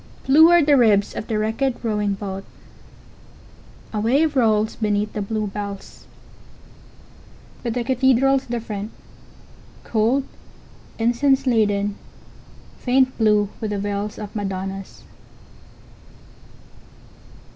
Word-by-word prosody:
Blue 310 Hz, +5 st, +7 dB
are 345 Hz, -2 st, +6 dB
the 290 Hz, 0 st, +4 dB
ribs 210 Hz, -5 st, +3 dB
of -, -, -5 dB
the 220 Hz, -, -1 dB
wrecked 235 Hz, +5 st, -1 dB
rowing 210 Hz, -3 st, 0 dB
boat. 195 Hz, -1 st, -6 dB, 1.5 s
A 215 Hz, -, -1 dB
wave 280 Hz, +8 st, +2 dB
rolls 220 Hz, -3 st, +2 dB
beneath 210 Hz, -1 st, -1 dB
the 210 Hz, -, -3 dB
blue 215 Hz, +1 st, -2 dB
bells. 200 Hz, -1 st, -7 dB, 1.5 s
But 235 Hz, -1 st, -3 dB
the 245 Hz, -, -1 dB
cathedral's 265 Hz, +1 st, +2 dB
different, 220 Hz, -3 st, -4 dB, 0.9 s
cold, 235 Hz, +5 st, +1 dB, 0.7 s
incense 265 Hz, +4 st, +2 dB
laden, 205 Hz, -4 st, +1 dB, 0.8 s
faint 260 Hz, 0 st, +2 dB
blue 210 Hz, -2 st, +3 dB
with 220 Hz, -, -3 dB
the 205 Hz, -, -2 dB
veils 205 Hz, +1 st, -3 dB
of 210 Hz, +1 st, -8 dB
madonnas. 195 Hz, -1 st, -5 dB
220 Hz, 105 wpm, -21 LUFS, 205-255 Hz, 1.5 s, Blue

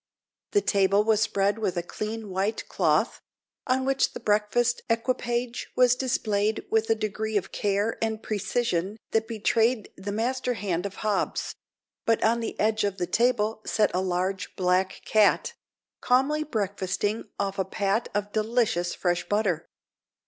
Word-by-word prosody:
The 410 Hz, -, +4 dB
table 200 Hz, -, +3 dB
was 220 Hz, -1 st, +3 dB
spread 200 Hz, 0 st, +1 dB
with 195 Hz, -5 st, -1 dB
a 175 Hz, -, 0 dB
clean 215 Hz, +3 st, -5 dB
white 195 Hz, +4 st, -1 dB
cloth, -, -, +1 dB, 0.5 s
on 260 Hz, 0 st, +1 dB
which 270 Hz, 0 st, +1 dB
the -, -, -6 dB
breakfast 215 Hz, +3 st, +1 dB
equipage 240 Hz, +1 st, -1 dB
was 250 Hz, -1 st, +5 dB
displayed 215 Hz, -5 st, 0 dB
with 220 Hz, 0 st, +2 dB
a 225 Hz, -, +4 dB
degree 215 Hz, 0 st, -2 dB
of 195 Hz, -, -3 dB
care 205 Hz, +2 st, 0 dB
and 220 Hz, -1 st, -1 dB
precision 205 Hz, -2 st, -1 dB
that 225 Hz, 0 st, +1 dB
betrayed 225 Hz, 0 st, +1 dB
the 200 Hz, +2 st, -5 dB
master 245 Hz, +3 st, -1 dB
hand 190 Hz, -3 st, -2 dB
of 200 Hz, -, -11 dB
Hobbs; 210 Hz, -2 st, 0 dB, 0.5 s
but 225 Hz, -1 st, +3 dB
on 230 Hz, +2 st, +3 dB
the 230 Hz, -, -5 dB
edge 215 Hz, 0 st, +2 dB
of 200 Hz, -1 st, -1 dB
the 175 Hz, -, -1 dB
table 220 Hz, +2 st, +1 dB
sat 215 Hz, -, +2 dB
a 180 Hz, -, +1 dB
large 185 Hz, +1 st, -2 dB
black 185 Hz, +1 st, +1 dB
cat, 215 Hz, -2 st, +3 dB, 0.5 s
calmly 270 Hz, +5 st, +2 dB
breakfasting 205 Hz, -4 st, -2 dB
off 195 Hz, 0 st, -2 dB
a -, -, +3 dB
pat 200 Hz, +4 st, -1 dB
of 205 Hz, 0 st, -1 dB
delicious 215 Hz, -5 st, 0 dB
fresh 175 Hz, -1 st, -1 dB
butter. 205 Hz, -6 st, 0 dB
215 Hz, 150 wpm, -26 LUFS, 195-230 Hz, 0.5 s, was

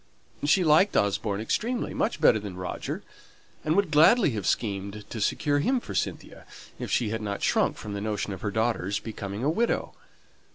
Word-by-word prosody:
She 165 Hz, +6 st, +4 dB
liked 160 Hz, +5 st, +4 dB
Osborne 100 Hz, 0 st, 0 dB
extremely, 235 Hz, -, -1 dB
much 225 Hz, -, -1 dB
better 110 Hz, -, +5 dB
than 100 Hz, -3 st, -7 dB
Roger; 90 Hz, -1 st, -5 dB, 0.6 s
and 155 Hz, +1 st, +1 dB
would 200 Hz, -5 st, +2 dB
gladly 160 Hz, -, +6 dB
have 105 Hz, -6 st, -3 dB
schemed 100 Hz, +1 st, -2 dB
to 110 Hz, -, -4 dB
secure 145 Hz, +7 st, +1 dB
him 255 Hz, -, +2 dB
for 235 Hz, -, -8 dB
Cynthia, 95 Hz, -, -4 dB, 0.3 s
if -, -, -4 dB
she 115 Hz, -, +1 dB
had 110 Hz, +1 st, -3 dB
not 100 Hz, -1 st, -4 dB
shrunk -, -, +2 dB
from 105 Hz, -, -7 dB
the 100 Hz, -, -4 dB
notion 105 Hz, -1 st, -2 dB
of 95 Hz, -, -8 dB
her 105 Hz, -, -1 dB
daughter's 105 Hz, -2 st, 0 dB
becoming 105 Hz, 0 st, -6 dB
a 145 Hz, -, +2 dB
widow. 230 Hz, +8 st, 0 dB
110 Hz, 180 wpm, -27 LUFS, 100-155 Hz, 0.6 s, gladly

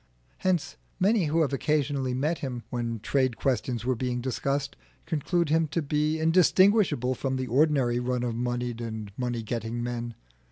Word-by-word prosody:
Hence 185 Hz, -4 st, 0 dB, 0.2 s
many 200 Hz, 0 st, +3 dB
who 160 Hz, +2 st, +2 dB
have 140 Hz, -3 st, +1 dB
occasionally 140 Hz, -2 st, 0 dB
met 150 Hz, +6 st, 0 dB
him 125 Hz, -4 st, -4 dB
when 115 Hz, -2 st, -2 dB
trade 130 Hz, -1 st, +1 dB
questions 120 Hz, -2 st, -1 dB
were 130 Hz, -, +2 dB
being 125 Hz, 0 st, -2 dB
discussed, 140 Hz, +3 st, -2 dB, 0.3 s
conclude 165 Hz, +1 st, 0 dB
him 160 Hz, +1 st, +3 dB
to 165 Hz, +3 st, -1 dB
be 150 Hz, +2 st, 0 dB
indistinguishable 170 Hz, -, +4 dB
from 130 Hz, +1 st, -2 dB
the 130 Hz, 0 st, -2 dB
ordinary 130 Hz, -2 st, +2 dB
run 125 Hz, 0 st, -1 dB
of 120 Hz, -1 st, -1 dB
moneyed 120 Hz, 0 st, -2 dB
and 110 Hz, -3 st, -5 dB
money 120 Hz, -2 st, -2 dB
getting 115 Hz, +1 st, -3 dB
men. 120 Hz, -1 st, -4 dB
130 Hz, 160 wpm, -27 LUFS, 120-155 Hz, 0.3 s, indistinguishable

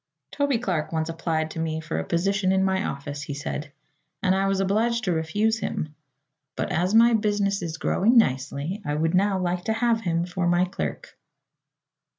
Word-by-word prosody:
"Toby 285 Hz, -3 st, +1 dB
Clark 180 Hz, -10 st, -2 dB
once 160 Hz, 0 st, -1 dB
applied 160 Hz, -1 st, -2 dB
to 165 Hz, -, -6 dB
me 160 Hz, -1 st, -1 dB
for 160 Hz, +1 st, -3 dB
a -, -, -2 dB
position 190 Hz, +3 st, +1 dB
in 190 Hz, 0 st, +3 dB
my 190 Hz, +1 st, +1 dB
office," 145 Hz, -2 st, -5 dB
he 145 Hz, -1 st, -5 dB
said, 145 Hz, +1 st, -5 dB, 0.5 s
"and 185 Hz, -, +3 dB
I 195 Hz, +1 st, +1 dB
was 195 Hz, 0 st, +1 dB
obliged 225 Hz, +5 st, +1 dB
to 185 Hz, -, 0 dB
refuse 205 Hz, +8 st, 0 dB
him. 150 Hz, -7 st, -3 dB, 0.6 s
But -, -, -2 dB
as 180 Hz, +5 st, +1 dB
my 235 Hz, +1 st, +7 dB
business 205 Hz, -3 st, +1 dB
is 165 Hz, -2 st, -4 dB
growing 225 Hz, +8 st, +2 dB
nicely 145 Hz, -, +1 dB
I 145 Hz, -3 st, -2 dB
would 160 Hz, +2 st, 0 dB
now 195 Hz, +1 st, +3 dB
like 180 Hz, -1 st, -1 dB
to 220 Hz, -, +1 dB
have 230 Hz, 0 st, +1 dB
him 170 Hz, -3 st, 0 dB
for 175 Hz, 0 st, -2 dB
my 175 Hz, +1 st, +3 dB
clerk." 185 Hz, -, -6 dB
185 Hz, 185 wpm, -25 LUFS, 160-205 Hz, 0.6 s, my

